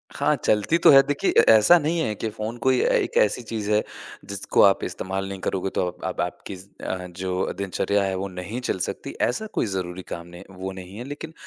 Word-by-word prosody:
हाँ, - - +2
चलती 105 +10 +1
तो - - +8
है। 135 -1 +9
देखिए 145 -1 +1
ए - - +10
ऐसा 110 +11 +7
नहीं 165 +2 0
है 110 -9 0
कि 110 - -3
फ़ोन 110 +2 -5
कोई 130 +1 +2
एक - - +1
ऐसी 105 - -1
चीज़ 110 -3 -4
है 105 0 +4 0.5
जिसको 100 0 +1
आप 100 -1 +4
इस्तेमाल 95 +1 -4
नहीं 100 -1 -6
करोगे 95 0 -2
तो - - +1
आप 90 0 -8
आप 95 - -2
आपकी 90 +2 -5
ज़ 95 +2 -12 0.2
अ, 90 -1 -3
जो 90 +1 -3
दिनचर्या 100 +1 0
है 95 -1 -1
वो 95 +1 -3
नहीं 95 +5 -6
चल - - -1
सकती - - -6
ऐसा 220 - 0
कोई - - 0
ज़रूरी 95 -3 -4
काम 85 0 -6
नहीं 85 +1 -11
है 95 - -14
वो 95 +1 -4
नहीं 95 +1 -10
है। 120 - -5
लेक़िन 145 +4 -8
100 Hz, 230 wpm, -24 LUFS, 95-115 Hz, 0.5 s, ए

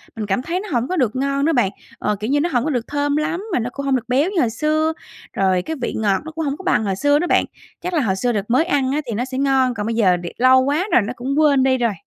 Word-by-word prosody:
mình 220 -2 -4
cảm 200 +4 0
thấy 340 +7 -2
nó 415 +2 -7
hổng 245 -2 0
có 370 - -2
được 250 -6 +1
ngon 275 +1 0
đó 325 - +2
bạn. 240 -8 +2 0.3
Ờ, 210 - 0
kiểu 215 +3 -3
như 290 +2 +2
nó 340 +4 0
hổng 245 -6 +1
có 310 - -1
được 245 -5 -2
thơm 290 0 -1
lắm 315 +5 -1
mà - - +2
nó 240 +1 -2
cũng 280 - -5
hông 275 -1 +2
được 245 -2 -3
béo 275 +7 +2
như 375 - 0
hồi 240 - +2
xưa, 310 +6 0 0.4
rồi 190 -2 +1
cái 320 - -5
vị - - -2
ngọt 200 -3 +1
nó 315 - -7
cũng 320 0 -4
hổng 280 0 -2
có 380 - -11
bằng 365 - +2
hồi 195 -2 -1
xưa 290 +8 +2
đó 350 - -1
bạn. - - +3 0.4
Chắc 360 +1 -4
là 315 - +2
hồi 200 -7 0
xưa 245 +5 0
đợt 210 0 -3
mới 260 +7 +3
ăn 270 -4 0
á 295 +2 0
thì 235 - -3
nó 235 +4 -1
sẽ 260 0 -6
ngon, 270 -2 +2
còn 210 -3 -4
bây 230 +1 -2
giờ 190 -6 +3
đề 175 -1 -7
lâu 255 +1 +5
quá 295 +9 0
rồi - - +5
nó 210 +4 -4
cũng 270 +4 -1
quên 285 -4 +4
đi 260 -1 +3
rồi. 235 -4 0
260 Hz, 325 wpm, -20 LUFS, 230-300 Hz, 0.4 s, lâu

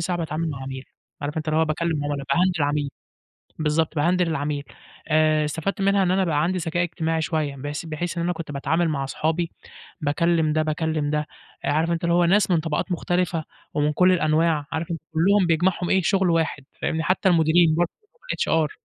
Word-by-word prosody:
ساعة 175 +1 -1
باتعامل 160 0 -2
مع 135 -2 -6
عميل، 130 0 -6 0.4
عارف 145 +1 -4
أنت 155 0 -3
اللي 155 - +2
هو 160 - +4
باكلّم 155 -1 -1
عُملا، 145 -1 -2
باهندِل 175 -3 +2
عميل، 145 0 0 0.7
بالضبط، 155 0 0
باهندِل 175 +3 +2
العميل. 145 -2 -2 0.4
آآ 155 -1 +3
استفدت 165 +7 -3
منها 195 0 +3
إن 180 - +2
أنا 190 +1 +2
بقى 155 -4 +1
عندي 185 +3 0
ذكاء 170 0 -1
اجتماعي 165 -1 -1
شوية، 150 -3 -1
بحيث 145 +3 -5
بحيث 165 +3 -4
إن - - 0
أنا 175 +1 0
كنت 165 -3 -7
باتعامل 160 +4 0
مع 140 -3 -1
اصحابي 160 +5 -1 0.5
باكلّم 160 +1 +1
ده، 155 0 +2
باكلّم 155 -1 -1
ده، 150 0 -1 0.4
آآ، - - +1
عارف 160 +3 +1
أنت 170 0 -1
اللي 170 0 +2
هو 175 0 +4
ناس 195 +4 +3
من 170 -3 +3
طبقات 160 +3 -2
مختلفة 175 -2 -1 0.3
ومن 150 0 +1
كل 180 +3 +4
الأنواع، 155 -2 +2
عارف 160 +1 -3
أنت 165 - -3
كُلّهم 190 +4 +4
بيجمعهم 175 +2 +1
إيه، 190 - +3
شُغل 190 0 +2
واحد، 160 -4 0 0.2
فاهمني؟ 160 - 0
حتّى 185 +2 +2
المديرين 165 -1 +4
بر 175 +2 +2 0.5
الHR. 160 -2 +1
160 Hz, 195 wpm, -24 LUFS, 150-175 Hz, 0.7 s, هو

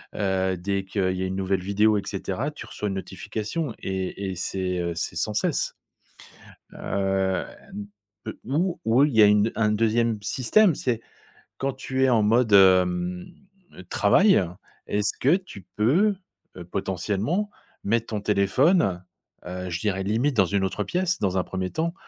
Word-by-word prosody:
heu, 95 -1 0
dès 100 +2 -2
qu'il 95 -1 -1
y 95 - -2
a - - 0
une 95 0 -3
nouvelle 95 -1 -1
vidéo 105 +3 +2
et - - -1
cetera, 100 +8 -3
tu 150 - -10
reçois 105 0 -5
une 95 - -3
notification 105 - -4
et 95 +1 -3
et - - -5
c'est, 90 0 -2
heu, 85 -1 -2
c'est 85 - -3
sans 105 +5 -1
cesse. 105 - 0 1.0
Heu, 95 -2 -1 1.0
ou 170 +8 -1
ou 120 +5 +4
il 150 - 0
y 110 - +7
a - - +8
une 105 +2 +3
un 105 -2 +2
2e 115 0 +1
système, 155 - +3
c'est 120 -5 -1 0.6
quand 135 0 -2
tu 130 0 -2
es - - +3
en 115 -4 +3
mode, 115 +1 +3
hem, 90 -2 +4 0.6
travail, 185 - +4 0.4
est-ce 105 0 0
que 140 +7 +4
tu 180 - -12
peux, 175 - +3 0.6
potentiellement, 100 - -1 0.3
mettre 115 +2 0
ton 105 -2 -3
téléphone, 100 - +2 0.4
heu, 90 +1 -5
je 85 -1 -3
dirais 95 -3 -1
limite 115 +8 0
dans 95 - +5
une 100 +2 0
autre 95 +2 -2
pièce, 180 - -1
dans 95 -2 0
un 90 - +1
1er 95 0 -4
temps, 165 +1 -1
105 Hz, 160 wpm, -25 LUFS, 95-125 Hz, 1.0 s, a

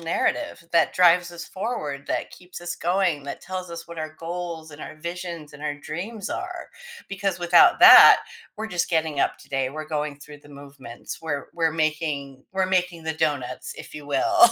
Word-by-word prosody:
narrative 170 - -1
that 165 -1 +3
drives 175 -1 +4
us 170 -2 -8
forward, 150 - -4
that - - -2
keeps 180 -1 -11
us 175 0 -4
going, 175 -4 0
that 140 - -7
tells 185 -1 -6
us 170 0 -8
what 170 -1 -9
our 155 0 -6
goals 165 -2 -6
and 145 - -12
our 155 - -9
visions 170 -1 -6
and 150 0 -12
our 145 -1 -3
dreams 200 +8 -6
are - - -5 0.4
because 195 -2 -2
without 175 - +5
that, - - +10 0.3
we're 220 - -4
just 180 -5 -2
getting 160 -3 0
up - - 0
today, 135 -2 -3
we're 155 +2 -6
going 150 -2 -3
through 150 0 -12
the 145 - -19
movements, 140 -4 -10
we're 145 -3 -3
we're 165 -1 +1
making 155 -4 -2
we're 190 -1 +1
making 180 -3 0
the 160 - -1
donuts 145 -6 -2
if - - -11
you 150 -1 -8
will. 350 - 0
165 Hz, 185 wpm, -24 LUFS, 150-180 Hz, 0.4 s, that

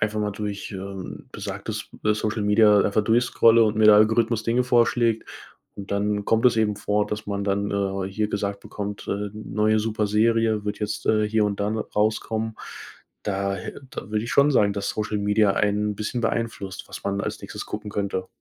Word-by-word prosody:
einfach 110 0 0
mal 105 0 -1
durch, 105 0 -5
ähm, 95 -1 -7
besagtes, - - -6
äh, 105 0 +3
Social 110 0 -2
Media 105 0 +5
einfach 105 +1 +1
durchscrolle 115 0 +4
und 110 0 0
mir 110 - +3
der 105 - +9
Algorithmus 110 +1 +3
Dinge 120 +2 +2
vorschlägt, 120 -2 +2 0.5
und 100 -1 -8
dann 105 0 0
kommt 115 +3 +1
es 120 -2 +3
eben 105 -2 +1
vor, 105 0 0
dass 105 +1 -5
man 100 -1 -2
dann, 100 0 0
äh, 95 -1 -1
hier 105 +2 -1
gesagt 100 -1 -3
bekommt: 105 0 -6
„Äh, 100 0 -2
neue 110 0 0
super 110 -1 -1
Serie 110 0 +2
wird 105 0 -3
jetzt, 105 0 -3
äh, 110 -1 +2
hier 110 0 +2
und 100 -1 -2
dann 105 +2 -1
rauskommen.“ 110 +1 -1 0.7
Da 100 -1 -1
äh, 90 - -8
da - - -7
würde 105 0 -1
ich 115 - -5
schon 140 +4 +5
sagen, 105 -7 +3
dass 100 -1 -2
Social 105 0 -2
Media 105 0 +3
einen 105 +1 +1
'n - - -12
bisschen 110 +4 -3
beeinflusst, 110 -4 -3
was - - -9
man 100 0 -1
als - - -4
Nächstes - - -7
gucken 105 0 -6
könnte. 100 -2 -2
105 Hz, 195 wpm, -24 LUFS, 100-110 Hz, 0.7 s, der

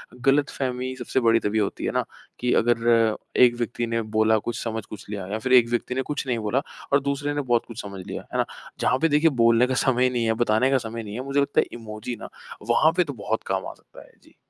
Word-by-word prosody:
ग़लतफ़हमी 130 -1 0
सबसे 130 - -1
बड़ी 115 -1 +4
तभी 110 +1 0
होती 100 - -2
है - - 0
ना - - 0 0.4
कि 125 0 +1
अगर 115 -1 +3 0.2
एक 120 -1 +6
व्यक्ति 120 0 -2
ने 115 0 -1
बोला, 110 0 +2
कुछ 120 +2 -4
समझ 110 -2 -3
कुछ 105 - -10
लिया 100 -3 -4
या 110 - -1
फिर 130 +2 0
एक 120 -2 +7
व्यक्ति 120 +1 -2
ने 130 - 0
कुछ 145 - -2
नहीं 120 -2 0
बोला 110 +6 0 0.3
और 140 - +6
दूसरे 140 +1 -2
ने 145 - -1
बहुत 120 -3 +1
कुछ 115 -1 -7
समझ 100 -3 -8
लिया। - - -5
है - - -1
ना? - - +2 0.3
जहाँ 130 - +2
पे 165 - +3
देखिए, 150 +3 +4
बोलने 115 -1 +4
का 130 - -1
समय 125 -1 +3
नहीं 120 -2 -1
है, 110 - +2
बताने 110 +4 +2
का 135 - +4
समय 115 0 -6
नहीं 105 -1 -8
है 125 - -4
मुझे 140 +1 0
लगता 140 - +1
है - - -2
इमोजी 110 +1 -6
ना - - -8 0.4
वहाँ 155 +7 +5
पे 180 - +5
तो 145 -4 -6
बहुत 110 0 -3
काम 95 0 -1
आ - - -7
सकता - - -17
है। - - -21
जी। - - -23
120 Hz, 255 wpm, -24 LUFS, 110-130 Hz, 0.4 s, एक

